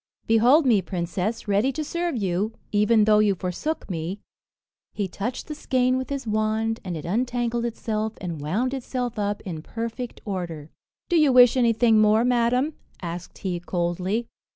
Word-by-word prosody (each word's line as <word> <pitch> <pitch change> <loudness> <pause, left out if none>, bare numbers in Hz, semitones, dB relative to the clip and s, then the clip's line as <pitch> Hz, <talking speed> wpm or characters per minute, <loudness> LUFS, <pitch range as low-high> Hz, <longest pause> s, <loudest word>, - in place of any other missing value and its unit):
"Behold 245 +8 +5
me, 225 -6 +4
princess, 185 +6 -3
ready 205 +6 +2
to 310 - -3
serve 340 -1 -2
you, 200 +2 -1 0.2
even 210 +1 +4
though 210 0 +5
you 210 -2 +3
forsook 185 - -3
me." 175 +2 -4 0.7
He 205 -2 -2
touched 205 +7 -4
the 305 - -4
skein 255 -3 +1
with 260 0 -3
his 280 -2 -3
wand, 220 +1 0
and 180 -3 -4
it 150 - -7
untangled 240 +4 -1
itself, 220 -2 -2
and 170 -5 -5
wound 215 - -1
itself 245 -3 -3
up 205 0 -1
in 165 -5 -6
perfect 230 +6 -5
order. 170 -7 -5 0.4
"Do 345 - +2
you 305 -4 +5
wish 250 -1 +7
anything 230 -2 +4
more, 215 +2 +4
madam?" 250 +4 +2 0.3
asked 175 0 -6
he 180 -3 -3
coldly. 180 +6 -2
220 Hz, 160 wpm, -24 LUFS, 190-245 Hz, 0.7 s, wish